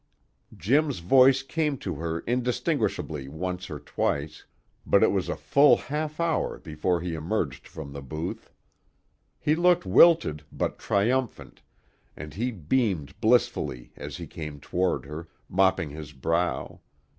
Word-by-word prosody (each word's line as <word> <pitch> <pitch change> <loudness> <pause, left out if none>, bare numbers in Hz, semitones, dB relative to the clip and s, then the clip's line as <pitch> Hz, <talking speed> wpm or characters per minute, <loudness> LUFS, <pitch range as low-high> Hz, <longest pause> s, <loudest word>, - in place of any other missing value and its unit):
Jim's 140 - +2
voice 130 +9 +5
came 150 +1 -1
to 95 -6 -4
her 80 +2 -3
indistinguishably 120 - -1
once 90 +5 -5
or 75 - -6
twice, 75 +1 -3 0.4
but - - +4
it - - +5
was - - -1
a - - -1
full 140 0 +5
half 150 +2 -4
hour 170 -2 0
before 80 +3 -1
he 90 -1 -3
emerged 80 - -3
from 70 -3 -9
the 70 - -7
booth. 75 +5 -6 0.9
He 150 - +2
looked 175 +2 +3
wilted 160 - +5
but - - -3
triumphant, 120 +5 -1 0.6
and 75 -1 -8
he 120 +6 -1
beamed 95 - -1
blissfully 110 - +1
as - - -7
he - - -6
came 75 -2 -7
toward 90 +4 -1
her, 75 +4 -7 0.2
mopping 95 -4 +2
his 75 -1 -9
brow. 85 +6 -1
90 Hz, 135 wpm, -26 LUFS, -, 0.9 s, voice